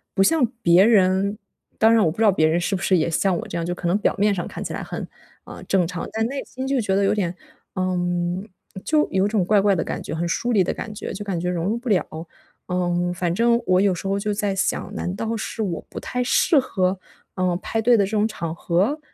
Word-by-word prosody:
不 195 - +4
像 320 +3 +3 0.2
别 170 +2 +6
人 200 -1 +3 0.4
当 225 +1 +5
然 225 -2 +5
我 160 - +3
不 170 - -11
知 225 - +2
道 210 - +6
别 155 -4 +3
人 165 +2 +1
是 195 +3 -1
不 180 - -4
是 190 -1 +3
也 160 - +1
像 180 +2 +1
我 - - -6
这 - - -7
样， 165 - -2
就 175 - -2
可 175 - -4
能 175 - +2
表 - - +1
面 205 +1 +3
上 175 - -3
看 - - -6
起 - - -5
来 - - -4
很， - - -6 0.4
呃， - - -10
正 185 -3 +2
常， 180 -1 -5
但 220 0 -1
内 275 +2 -4
心 260 +1 -6
就 270 -3 +1
觉 195 -2 0
得 200 - +2
有 - - +3
点 180 -4 -1 0.4
呃， 185 0 0 0.9
就 305 -1 +2
有 190 +1 +2
种 205 -4 +1
怪 205 0 +4
怪 200 -1 +3
的 165 - -1
感 - - -4
觉， 155 - -6
很 170 +1 -1
疏 240 +8 -1
离 200 -5 +4
的 - - -2
感 220 - -6
觉， 210 - -6
就 205 +2 -6
感 190 -4 -3
觉 180 +1 -2
融 175 +1 -2
入 225 +3 0
不 245 +1 -9
了。 165 -4 -1 0.4
嗯， 175 0 0
反 175 -1 -1
正 235 +1 +3
我 185 0 +4
有 200 -2 +3
时 195 - -5
候 195 +1 0
就 210 0 -1
在 205 -1 -1
想， 195 - -1
难 180 +2 -3
道 225 +2 -2
是 220 - -5
我 175 -4 -4
不 - - -7
太 250 0 -2
适 290 +5 +3
合， 185 -6 -1 0.4
嗯， 180 -2 0
派 225 - -2
对 240 +1 +5
的 200 - +3
这 195 - -6
种 215 0 +2
场 165 -7 -5
合？ 190 - 0
195 Hz, 280 characters per minute, -22 LUFS, 175-220 Hz, 0.9 s, 别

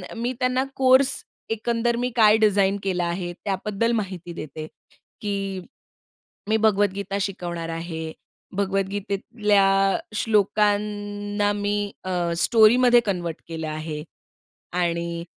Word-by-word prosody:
मी 240 +3 -2
त्यांना 255 +1 +1
कोर्स 260 0 +4 0.3
एकंदर 235 +1 0
मी 245 +1 -1
काय 215 -1 +6
डिझाइन 200 -2 +3
केला 180 -2 0
आहे? 175 0 -3
त्याबद्दल 200 +4 -2
माहिती 185 -5 -4
देते, 155 -1 -7 0.6
की 195 -2 -2 0.9
मी 220 - +3
भगवद्गीता 200 -2 +1
शिकवणार 175 -4 -4
आहे. 165 -1 -5 0.5
भगवद्गीतेतल्या 195 0 +1 0.2
श्लोकांना 205 -1 +1
मी 205 0 -1
अ, 175 -2 -1
स्टोरीमध्ये 240 +6 +6
कन्व्हर्ट 175 -5 -2
केलं 160 -1 -5
आहे 155 0 -5 0.7
आणि, 170 -1 -1
200 Hz, 100 wpm, -24 LUFS, 175-215 Hz, 0.9 s, काय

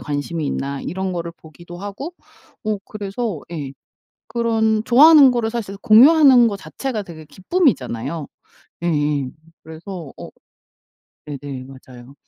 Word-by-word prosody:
관심이 145 +2 -4
있나 140 0 -3
이런 190 +1 -4
거를 170 -1 -5
보기도 170 +2 -13
하고 205 - -7 0.5
어 215 -2 -1
그래서 205 -3 -5
예. 145 -5 -5 0.6
그런 220 -2 0
좋아하는 285 +4 +7
거를 235 -2 -1
사실 210 -4 -5
공유하는 255 +3 +6
거 210 - -2
자체가 230 -1 -5
되게 160 -4 -12
기쁨이잖아요. 160 - -1 0.6
예예 145 -5 0 0.3
그래서 160 -1 -9
어 - - -9 1.0
네네 140 -3 -7
맞아요. 130 0 -14
185 Hz, 275 characters per minute, -20 LUFS, 145-230 Hz, 1.0 s, 좋아하는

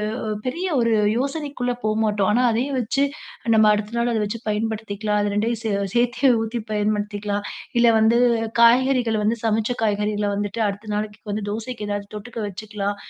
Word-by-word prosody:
ஓ - - -4 0.3
பெரிய 340 +9 -2
ஒரு 230 -1 +2 0.2
யோசனைக்குள்ள 275 -2 -2
போமாட்டோம். 215 -2 +1
ஆனா 245 +4 +3
அதையே 250 +5 -1
வச்சி, 250 +4 0 0.5
நம்ம 220 - +6
அடுத்த 210 +2 -3
நாள் 235 0 +1
அத 220 - +1
வச்சு 220 +3 -4
பயன்படுத்திக்கலாம், 210 -1 -1
அது 205 0 0
2யும் 225 +1 0
சே 220 - -1 0.2
சேத்தே 245 +2 +3
ஊத்தி 225 +1 -3
பயன்படுத்திக்கலாம். 205 -1 -1 0.4
இல்ல 235 - +5
வந்து, 225 +2 +4 0.4
காய்கறிகள 245 -1 +4
வந்து, 225 +2 +1
சமச்ச 220 +2 +1
காய்கறிகள 210 0 0
வந்துட்டு, 205 +2 -2
அடுத்த 210 +2 -6
நாளைக்கு 210 0 -4
வந்து, 210 0 -3
தோசைக்கு 220 0 -5
ஏதாவது 205 0 -2
தொட்டுக்க 230 +3 -7
வச்சுக்கலாம். 205 0 -4
220 Hz, 155 wpm, -22 LUFS, 210-235 Hz, 0.5 s, நம்ம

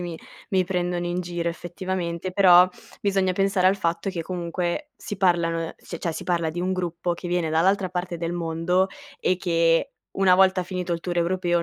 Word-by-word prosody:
mi 175 -2 -5 0.3
mi 190 -2 +2
prendono 175 -1 -1
in 175 +1 -1
giro, 175 -1 -3
effettivamente, 175 0 -4
però 180 -2 +7 0.3
bisogna 195 -2 +1
pensare 195 0 +2
al 190 +1 +4
fatto 170 0 -1
che 175 -3 -4
comunque, 175 - -3
si 205 - -6
parlano, 165 -3 +1
c 170 - -8
cioè 170 - -2
si - - -6
parla 170 -3 0
di 175 +2 -4
un 185 +1 0
gruppo 175 -1 -2
che 175 +1 -7
viene 175 -2 0
dall'altra 185 +4 +2
parte 180 -1 -3
del 165 0 -3
mondo 175 +2 0 0.3
e 185 - +2
che, 165 -2 +2 0.3
una 190 -1 +5
volta 190 0 +4
finito 180 -1 -3
il 170 - -2
tour 175 +1 -4
europeo, 175 0 +1
175 Hz, 185 wpm, -24 LUFS, 170-185 Hz, 0.3 s, però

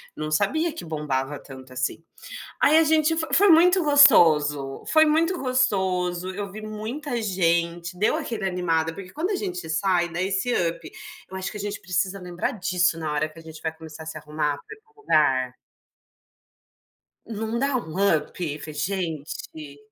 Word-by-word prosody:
Não 155 0 -4
sabia 305 - +1
que 330 - -8
bombava 145 -3 -3
tanto, 130 -1 -12
assim. 130 +5 -2 0.6
Aí 310 +2 +6
a 325 - +6
gente 315 +1 +3
fo 320 - -1
foi 405 +3 +6
muito 355 +2 +6
gostoso. 155 - +5
Foi 315 0 +5
muito 330 +4 +2
gostoso. 190 - 0
Eu 200 0 -5
vi 215 +1 -8
muita 230 +5 -4
gente, 170 -2 0
deu 210 - +2
aquele 225 -4 -3
animada, 165 -3 0
porque 185 -1 -10
quando 335 +6 -2
a - - +1
gente 365 - -4
sai, 175 +1 +1
dá 170 +2 -4
esse 195 +6 0
up. 170 -1 -2 0.4
Eu 190 - -9
acho 185 - -4
que 210 - -7
a - - -8
gente 205 +1 -4
precisa 185 +2 -1
lembrar 180 -1 -3
disso 180 -4 +1
na 155 -2 -3
hora 155 +1 0
que 160 +1 -15
a - - -11
gente 160 -1 -12
vai 160 - -2
começar 160 -1 -10
a - - -13
se 160 -1 -6
arrumar 150 -1 -2
pra 440 - -11
ir - - -28
para 445 - -32
o 430 - -21
lugar. 135 - +2 1.7
Não 225 +1 -4
dá 275 0 +1
um 160 -10 -5 0.2
up 155 -1 -5
ver 155 -1 -8
gente? 155 -3 -4
180 Hz, 180 wpm, -24 LUFS, 155-245 Hz, 1.7 s, Aí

